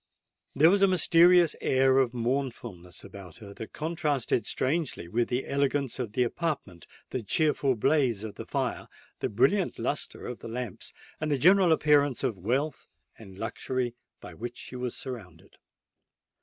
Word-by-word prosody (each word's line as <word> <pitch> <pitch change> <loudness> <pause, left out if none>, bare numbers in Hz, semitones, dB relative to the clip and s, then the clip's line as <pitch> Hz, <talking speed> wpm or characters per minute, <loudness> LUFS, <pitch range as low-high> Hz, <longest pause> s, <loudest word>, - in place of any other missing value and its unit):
There 160 +5 +6
was 200 0 +3
a 195 - +6
mysterious 175 -1 +5
air 130 0 +3
of 130 -3 +2
mournfulness 120 -7 -4
about 95 -4 -11
her 100 -3 -11
that 110 - -9
contrasted 150 -7 -1
strangely 130 - -1
with 115 +6 0
the 125 +1 -2
elegance 140 -2 0
of 115 -5 -4
the 125 - +2
apartment, 125 - -4 0.2
the 130 - -2
cheerful 140 - +1
blaze 120 -3 +1
of 110 -2 -6
the - - -9
fire, - - -2 0.3
the - - -1
brilliant 135 - +2
lustre 145 - -3
of 125 - -6
the - - -8
lamps, 120 -3 -6 0.3
and 155 -1 -2
the 145 - +2
general 185 +4 +5
appearance 145 -4 +3
of 115 - 0
wealth 130 - -2 0.3
and 95 -4 -12
luxury 120 +3 -3 0.3
by - - -10
which 120 +2 -7
she - - -7
was 125 -1 -4
surrounded. 100 -11 -9
130 Hz, 155 wpm, -28 LUFS, 115-150 Hz, 0.3 s, There